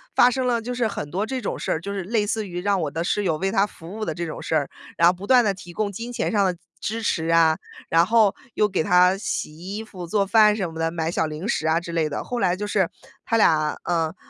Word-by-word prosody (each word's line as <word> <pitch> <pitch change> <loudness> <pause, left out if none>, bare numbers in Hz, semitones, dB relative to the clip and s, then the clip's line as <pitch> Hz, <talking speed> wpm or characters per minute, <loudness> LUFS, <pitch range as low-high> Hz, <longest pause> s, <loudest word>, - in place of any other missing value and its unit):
发 250 - +6
生 255 0 -1
了 235 -2 +1 0.3
很 145 -7 -5
多 195 +4 -1
这 260 +2 -3
种 - - -3
事 - - -2
儿， 160 - -1
就 200 +2 -5
是 195 -2 -3
类 210 +2 0
似 215 0 -2
于 175 -1 -5
让 200 0 +1
我 150 - -1
的 165 +3 -3
室 205 +3 0
友 160 - +1
为 195 +4 -1
他 200 -1 +3
服 175 +3 -11
务 220 - -3
的 - - -2
这 175 - -4
种 160 - -6
事 - - -2
儿， 145 -3 +1 0.3
然 170 - +6
后 - - +2
不 190 +3 -9
断 250 -2 +6
地 200 -3 +1
提 175 -2 -11
供 205 0 -1
金 230 +5 -6
钱 - - -1
上 205 -3 +3
的 180 - 0 0.2
支 225 +2 -3
持 165 -5 0
啊， 165 -1 +4 0.3
然 165 +1 +4
后， 220 -1 +4 0.2
又 210 - +2
给 190 - 0
他 180 +1 +4
洗 155 -6 -4
衣 195 +6 -6
服 185 -5 -9
做 200 +3 +1
饭 210 +1 +5
什 190 -6 -3
么 160 - -7
的， 165 0 +1
买 165 0 -2
小 165 - 0
零 155 +4 -5
食 160 -8 0
啊 165 +2 +2
之 170 - -7
类 165 -2 +1
的， 145 - -4
后 245 - -4
来 180 -4 +2
就 205 +3 -4
是， 195 -4 +1 0.4
他 230 - 0
俩， 155 -7 +3
嗯 165 -1 -1
185 Hz, 295 characters per minute, -23 LUFS, 165-210 Hz, 0.4 s, 发